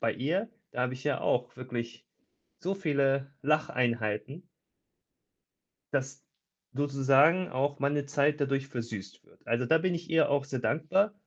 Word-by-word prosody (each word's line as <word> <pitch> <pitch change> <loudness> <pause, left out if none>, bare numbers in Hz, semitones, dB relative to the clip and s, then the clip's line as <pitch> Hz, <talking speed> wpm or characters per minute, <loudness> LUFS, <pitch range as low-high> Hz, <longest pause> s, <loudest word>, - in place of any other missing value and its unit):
bei 115 - +1
ihr, 180 - -1 0.2
da 125 - -2
habe 125 0 0
ich 130 0 -8
ja 145 0 -1
auch 125 0 0
wirklich, 120 -2 -6 0.5
so 190 +3 -2
viele 140 -6 +1
Lacheinheiten 125 - 0 1.5
dass 135 0 -2 0.5
sozusagen 140 +5 +4
auch 140 +2 -1
meine 140 +1 0
Zeit 145 +1 +1
dadurch 140 -1 0
versüßt 115 -6 -7
wird. - - -25
Also, 120 +2 0
da 160 +6 +5
bin 180 +2 0
ich 170 0 -5
ihr 165 -2 +4
auch 140 -1 +1
sehr 135 -2 -3
dankbar. 170 - +1
140 Hz, 145 wpm, -30 LUFS, 130-155 Hz, 1.5 s, da